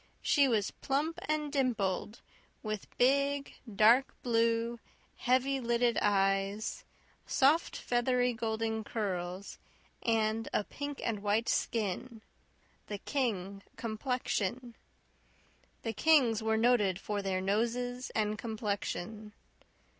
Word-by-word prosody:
She 285 -2 +4
was 215 -5 +1
plump 295 +4 -2
and 305 -1 0
dimpled, 220 -6 0 0.4
with 215 -2 -4
big, 280 +2 +2 0.2
dark 230 +6 +5
blue, 230 0 +1 0.4
heavy 260 +2 +2
lidded 235 -1 +2
eyes, 195 +1 +1 0.4
soft, 290 +5 +3
feathery, 245 0 +1
golden 220 -1 -2
curls, 190 -3 -4 0.4
and 225 -1 +1
a - - +2
pink 285 +5 -6
and 215 -3 -1
white 210 +3 +1
skin 225 +1 -1 0.6
"the 205 - -4
King 200 -6 -2
complexion." 240 0 -2 1.1
The 225 - -2
Kings 245 -3 +4
were 220 0 +1
noted 220 -6 +3
for 205 0 -3
their 190 -1 -1
noses 240 +6 -1
and 215 -1 0
complexion. 215 -1 -4
225 Hz, 100 wpm, -32 LUFS, 210-250 Hz, 1.1 s, dark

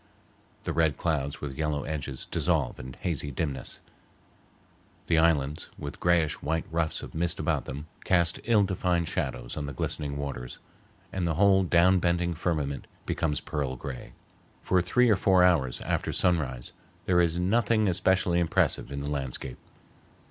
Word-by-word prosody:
The - - -2
red 80 -2 +2
clouds 70 -4 -1
with 70 -2 -5
yellow 75 -2 -1
edges 70 -4 -4
dissolve - - 0
in 65 0 -8
hazy 75 -5 -2
dimness; 70 -1 -4 1.2
the 80 -1 +3
islands, 75 -3 +1
with 70 0 -7
grayish 85 -3 +2
white 80 +2 -1
ruffs 80 -1 -1
of - - -9
mist 85 +1 0
about 80 -2 0
them, 70 +3 -6 0.2
cast 85 -2 +2
ill 115 -3 +4
defined 90 -3 0
shadows - - -3
on 75 -2 -4
the 70 - -5
glistening 70 +2 -3
waters, 65 -4 -5 0.6
and 90 -2 -1
the 80 - 0
whole 95 +1 +5
down 90 +1 +4
bending 85 0 +1
firmament 75 -4 -2 0.2
becomes 80 -3 -1
pearl 70 -4 -3
gray. 65 0 -7 0.5
For 90 -1 +3
three 125 +8 +3
or 110 - +5
four 95 -1 +4
hours 80 -9 +3
after - - -1
sunrise 70 -9 0 0.3
there 90 -1 +4
is 85 -1 +1
nothing 110 +3 +2
especially 90 -1 +3
impressive 85 -4 +1
in 70 0 -4
the 70 - -4
landscape. 65 -2 -4
80 Hz, 155 wpm, -28 LUFS, 70-90 Hz, 1.2 s, whole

